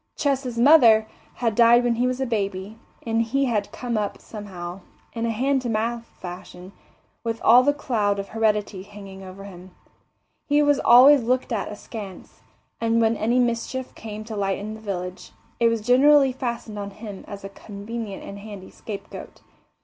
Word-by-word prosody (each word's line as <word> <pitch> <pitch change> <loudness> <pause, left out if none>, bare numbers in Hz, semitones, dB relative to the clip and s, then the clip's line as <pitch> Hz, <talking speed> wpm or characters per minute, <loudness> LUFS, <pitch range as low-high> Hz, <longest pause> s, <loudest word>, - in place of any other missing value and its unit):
Ches's 270 -4 -1
mother 235 -5 +6 0.3
had 230 -2 0
died 235 +2 +6
when 240 -1 +2
he 245 +2 +1
was 255 0 -2
a 265 - 0
baby, 205 -2 -3 0.3
and 225 0 +1
he 270 +5 0
had 210 -5 -1
come 240 -3 -3
up 205 -1 -3
somehow, 185 -4 -8 0.3
in 230 0 -2
a - - -1
hand 265 +4 +1
to 245 - -4
mouth 230 +1 -1
fashion, 180 +1 -9 0.5
with 230 -1 -3
all 240 +3 +7
the 285 +3 +3
cloud 220 -8 -1
of 200 0 -5
heredity 210 -3 0
hanging 195 -1 -11
over 190 +1 -10
him. 185 -2 -12 0.7
He 295 0 +3
was 290 -1 +3
always 265 +4 +7
looked 250 +1 0
at 210 - -2
askance, 205 -2 -9 0.4
and 230 0 +1
when 225 0 +3
any 230 +3 0
mischief 245 +1 -1
came 215 -1 -8
to 220 0 -7
light 195 -1 -1
in 210 +2 -6
the 220 - -9
village, 185 -3 -6 0.3
it 235 - +4
was 230 -1 0
generally 270 +4 +5
fastened 235 -4 -5
on 200 0 -5
him 205 -1 -9
as 200 -1 -8
a 195 - -6
convenient 205 +1 -7
and 200 0 -8
handy 200 -2 -10
scapegoat. 205 -3 -9
225 Hz, 175 wpm, -24 LUFS, 200-245 Hz, 0.7 s, all